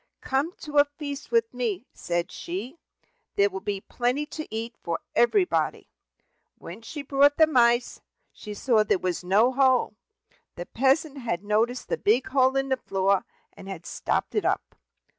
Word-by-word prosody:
"Come 275 +6 -1
to 295 -1 +1
a 285 - +7
feast 290 0 -7
with 230 0 +1
me," 235 -4 -2
said 175 0 -2
she; 225 - -6 0.6
"there 200 0 +3
will 190 - -4
be 200 0 -3
plenty 250 +6 -1
to 310 +1 -7
eat 225 +2 -4
for 170 -1 -2 0.2
everybody." 360 - +1 0.7
When - - -10
she 285 +6 -7
brought 280 +1 +3
the 320 - +7
mice, 240 -5 +2 0.3
she 210 -1 -8
saw 225 0 +3
there 210 - +2
was 180 -1 -3
no 205 +7 +4
hole. 260 -3 +3 0.6
The 175 - -6
peasant 275 - +1
had 210 -7 -3
noticed 225 +4 0
the - - -1
big 230 +5 +2
hole 260 0 +3
in 270 0 0
the 265 - +1
floor, 195 -3 0 0.3
and 195 - -11
had 180 -4 -7
stopped - - -2
it - - 0
up. - - -1
240 Hz, 165 wpm, -26 LUFS, 205-275 Hz, 0.7 s, a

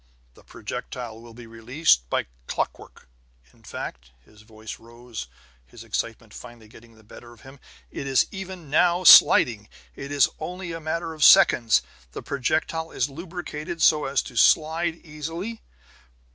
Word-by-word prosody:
The - - -20
projectile 115 -3 -8
will 115 -1 -14
be 120 0 -12
released 115 - 0
by - - -1 0.2
clockwork. - - -5 0.5
In - - -25
fact" - - -8 0.2
his 110 0 -20
voice 110 0 -11
rose, 120 - -10 0.4
his - - -14
excitement - - -5
finally 120 -3 -12
getting 115 +1 -18
the 110 - -21
better 120 +3 -14
of 115 - -20
him 135 +1 -15 0.3
"it 140 - -6
is 135 -1 +3
even 185 -6 -9
now 175 +3 +2
sliding! 110 - +7 0.3
It 140 - -8
is 145 -3 +4
only 180 +2 -6
a 165 - -6
matter 165 +1 -4
of 155 -2 -3
seconds; 115 -5 +6 0.3
the - - -7
projectile 155 +4 -2
is 130 -1 -2
lubricated 170 0 -7
so 155 -1 +3
as 135 0 -1
to 125 - -12
slide 160 +7 +2
easily." 165 +9 -7
140 Hz, 150 wpm, -24 LUFS, 115-165 Hz, 0.5 s, sliding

